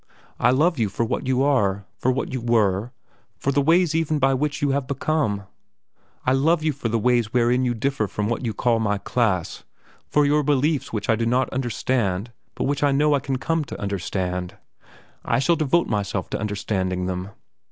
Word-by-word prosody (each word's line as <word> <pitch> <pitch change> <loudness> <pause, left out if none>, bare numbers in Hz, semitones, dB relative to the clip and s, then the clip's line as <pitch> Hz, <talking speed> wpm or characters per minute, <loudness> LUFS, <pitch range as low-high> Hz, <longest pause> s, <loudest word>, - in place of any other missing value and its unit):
I 120 - +4
love 150 +5 +2
you 110 -3 +1
for 115 +4 -1
what 115 - -3
you 130 0 +2
are, 100 -9 +1
for 130 - +1
what 130 - -3
you 130 - -2
were, 110 -2 +1 0.5
for 140 - -1
the 140 +1 +2
ways 165 +2 +3
even 160 -1 +1
by 135 -1 +3
which 145 +2 -1
you 145 -1 +1
have 135 -1 -1
become. 140 -7 -1 0.8
I 130 - +3
love 155 +4 +2
you 155 -1 +1
for 125 -4 -3
the 115 - +1
ways 120 -1 +1
wherein 125 +1 +2
you 120 -1 0
differ 125 -2 -1
from 105 +1 -2
what 115 +3 -2
you 115 - -1
call 115 +2 +1
my 105 -2 0
class, 100 -5 -1 0.4
for 150 0 +3
your 150 +1 +3
beliefs 145 0 +1
which 105 -2 -3
I 115 - +4
do 115 +1 -1
not 125 +2 +1
understand 120 -4 -1 0.2
but - - -2
which 140 0 -1
I 145 -1 +3
know 150 +2 +3
I 140 - +3
can 135 0 -2
come 165 +4 -1
to - - -8
understand. 90 -2 -3 0.7
I - - +1
shall 170 +6 +3
devote 165 +2 +2
myself 100 -3 -2
to - - -2
understanding 95 -3 -2
them. 90 +1 -3
125 Hz, 200 wpm, -23 LUFS, 105-140 Hz, 0.8 s, I